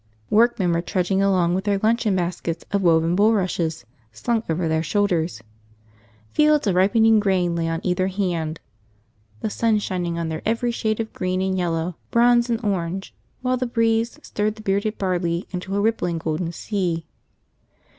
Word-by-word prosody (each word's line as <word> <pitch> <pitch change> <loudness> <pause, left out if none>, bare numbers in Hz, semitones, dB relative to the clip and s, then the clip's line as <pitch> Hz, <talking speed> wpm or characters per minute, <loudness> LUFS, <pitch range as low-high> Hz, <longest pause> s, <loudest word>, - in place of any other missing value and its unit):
Workmen 220 -5 +3
were 170 - +1
trudging 185 +2 0
along 185 -3 +2
with 190 +2 -1
their 200 -1 +2
luncheon 220 0 +1
baskets 170 -2 -3
of 200 0 +1
woven 165 -1 +3
bulrushes 185 - +1 0.3
slung 225 - -1
over 165 +1 0
their 160 0 +1
shoulders. 175 - 0 0.9
Fields 300 -2 +4
of 200 - +2
ripening 220 +4 +4
grain 185 -4 +1
lay 165 -1 -1
on 165 0 -2
either 185 0 +1
hand, 175 -5 -2 0.8
the - - -1
sun 225 0 +2
shining 175 -4 -2
on 165 -1 -2
their 160 0 -4
every 230 +2 0
shade 220 -2 -1
of 225 -1 -4
green 185 0 -1
and 190 0 0
yellow, 170 -1 -1
bronze 240 0 +4
and 230 -1 0
orange, 190 -1 -2 0.3
while 255 0 +1
the 255 0 -2
breeze 230 0 +1
stirred 210 +1 -2
the 215 - -12
bearded 200 +2 0
barley 175 -2 -1
into 190 +1 -4
a - - +1
rippling 200 -5 0
golden 165 +1 -2
sea. 175 -2 -2
190 Hz, 165 wpm, -23 LUFS, 170-220 Hz, 0.9 s, Fields